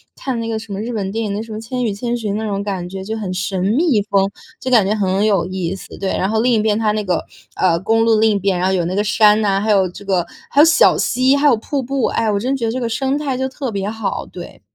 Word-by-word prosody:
看 260 -4 -3
那 230 - -3
个 225 -1 -2
什 220 -1 -9
么 195 - -4
日 235 +3 -4
本 195 -3 -3
电 225 +2 -2
影 205 - -2
的 210 - -3
什 225 - -11
么 215 - -5
《千 250 +2 -3
与 225 - 0
千 235 +4 -3
寻》， 215 -4 -3
那 220 - -3
种 200 -1 -2
感 190 -3 -4
觉， 190 +1 -7
就 220 +3 -4
很 195 -4 -4
神 185 0 -2
秘 245 - +2
风， 195 -1 +2 0.3
就 260 - -3
感 220 -6 +5
觉 210 - +1
很 195 0 +1
有 200 -5 +2
意 185 -1 -3
思， 195 - -11
对。 195 -1 -1
然 190 - 0
后 220 +1 +1
另 245 +1 +2
一 225 - +3
边， 210 0 +1
它 215 -2 +1
那 215 0 -1
个， 180 -4 -1 0.3
呃， 175 -3 +3
公 225 +3 +2
路 225 -1 +4
另 220 0 +4
一 205 - +1
边， 190 -2 0
然 185 - +1
后 190 - +1
有 175 -3 0
那 180 +2 -2
个 205 - +1
山 210 0 +4
呐， 195 -2 +1
还 215 +1 +1
有 195 -2 +3
这 180 - -11
个， 190 -3 +1 0.3
还 280 - +2
有 - - +8
小 325 - +5
溪， 255 +2 +2
还 285 +1 +3
有 275 - +5
瀑 275 +5 -3
布。 265 0 -1
哎， 225 -1 0
我 200 - 0
真 255 +6 -1
觉 250 -4 -2
得 225 - 0
这 255 - -3
个 235 - -2
生 265 +4 -1
态 285 -3 -2
就 265 - -1
特 265 -2 -5
别 200 -1 -2
好， 220 -2 -3
对。 175 -1 -10
215 Hz, 325 characters per minute, -18 LUFS, 195-235 Hz, 0.3 s, 有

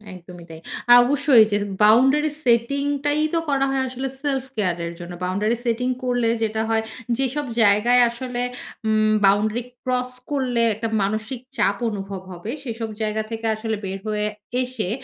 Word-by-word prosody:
একদমই 175 -1 -12
তাই। 160 -1 -9 0.3
আ - - +12
অবশ্যই 270 -2 +5
যে 205 - +2 0.3
boundary 265 +8 +5 0.2
setting 250 +4 +2 0.2
টাই 290 +1 +2
তো 335 - +3
করা 275 -1 +2
হয় 270 0 0
আসলে 260 +1 -4 0.2
self-care 260 -11 -1
এর 170 - -5
জন্য। 175 0 -8
boundary 210 +6 0
setting 245 +2 0
করলে 245 -2 +1 0.2
যেটা 220 0 -1
হয়, 225 0 +1 0.3
যেসব 270 +2 -1 0.2
জায়গায় 220 +4 +5
আসলে 245 +1 -5 0.5
উম 215 0 +3
boundary 210 +4 +2 0.2
cross 250 0 -1 0.2
করলে 255 -4 0
একটা 225 +2 -3 0.2
মানসিক 215 +5 -3 0.2
চাপ 200 - +2
অনুভব 195 -2 -5
হবে, 180 +5 -6
সেসব 230 -3 -4
জায়গা 215 0 0
থেকে 225 0 -5
আসলে 220 0 -3
বের 190 0 -4
হয়ে 210 -1 -1 0.4
এসে, 245 -7 -3
230 Hz, 155 wpm, -22 LUFS, 210-255 Hz, 0.5 s, আ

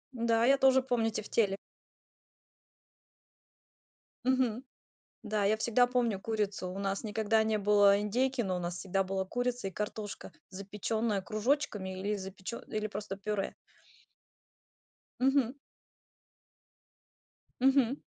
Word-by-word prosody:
Н-да, 230 0 +2
я 275 +1 +5
тоже 265 -1 +5
помню 240 -4 0
тефтели. 210 -2 0 2.7
Мгм. 255 -2 +1 0.6
Да, 210 -1 -1
я 215 +2 +3
всегда 240 +2 +3
помню 240 -5 0
курицу. 205 -4 -2
У 185 - -6
нас 195 +1 -2
никогда 220 +1 +1
не 220 -1 +1
было 205 0 +5
индейки, 250 +5 0
но 185 -4 -1
у - - -3
нас 175 0 -3
всегда 195 +1 0
была 190 0 -2
курица 245 0 -2
и - - -5
картошка, 210 +1 -5 0.2
запечённая 205 +2 -2
кружочками 215 -4 -1
или 205 +2 -1
запечё 190 +3 -6
или 215 -1 -2
просто 205 -1 -5
пюре. 205 -1 -2 1.7
Мгм. 265 -1 +2 2.1
Мгм. 270 0 +4
215 Hz, 115 wpm, -31 LUFS, 195-245 Hz, 2.7 s, я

